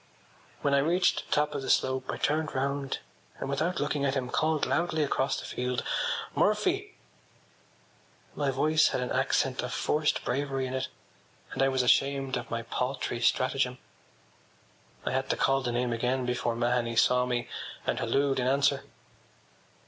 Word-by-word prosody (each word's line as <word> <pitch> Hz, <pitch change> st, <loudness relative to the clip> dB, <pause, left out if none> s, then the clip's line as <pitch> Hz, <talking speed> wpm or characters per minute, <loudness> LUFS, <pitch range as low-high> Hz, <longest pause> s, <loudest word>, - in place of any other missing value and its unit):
When 140 Hz, -, +2 dB
I 140 Hz, -, +5 dB
reached 175 Hz, +5 st, +2 dB
the -, -, -20 dB
top 150 Hz, 0 st, +2 dB
of 140 Hz, -, -3 dB
the 135 Hz, -, -5 dB
slope 130 Hz, 0 st, +1 dB
I -, -, -2 dB
turned 155 Hz, 0 st, 0 dB
round 140 Hz, +1 st, -1 dB, 0.4 s
and, -, -, -3 dB
without 155 Hz, +6 st, -1 dB
looking 145 Hz, 0 st, -1 dB
at 135 Hz, 0 st, +1 dB
him, 125 Hz, -2 st, -2 dB
called 155 Hz, -1 st, +1 dB
loudly 160 Hz, -2 st, +1 dB
across 140 Hz, -1 st, 0 dB
the -, -, -8 dB
field: 125 Hz, 0 st, -2 dB, 0.5 s
“Murphy!” 370 Hz, -, +1 dB, 1.4 s
My 145 Hz, -2 st, 0 dB
voice 155 Hz, +4 st, +3 dB
had -, -, -1 dB
an 125 Hz, -, -3 dB
accent 130 Hz, 0 st, +1 dB
of 125 Hz, -, -4 dB
forced 150 Hz, +3 st, 0 dB
bravery 135 Hz, +1 st, -1 dB
in 130 Hz, -, -4 dB
it 130 Hz, 0 st, -1 dB, 0.6 s
and -, -, -2 dB
I 135 Hz, -, +5 dB
was 130 Hz, -1 st, +1 dB
ashamed 135 Hz, +1 st, +2 dB
of 120 Hz, -, -4 dB
my 115 Hz, 0 st, -3 dB
paltry 125 Hz, 0 st, -2 dB
stratagem. 130 Hz, +1 st, +1 dB, 1.3 s
I -, -, 0 dB
had 130 Hz, +1 st, -1 dB
to -, -, +1 dB
call 135 Hz, 0 st, +2 dB
the 125 Hz, -2 st, -2 dB
name 120 Hz, 0 st, 0 dB
again 125 Hz, +2 st, 0 dB
before 120 Hz, -1 st, -1 dB
Mahony 120 Hz, 0 st, 0 dB
saw 125 Hz, +2 st, +4 dB
me 120 Hz, -1 st, -1 dB, 0.4 s
and -, -, 0 dB
hallooed 140 Hz, -1 st, +1 dB
in 125 Hz, -, 0 dB
answer. 140 Hz, +2 st, +2 dB
135 Hz, 165 wpm, -29 LUFS, 125-145 Hz, 1.4 s, I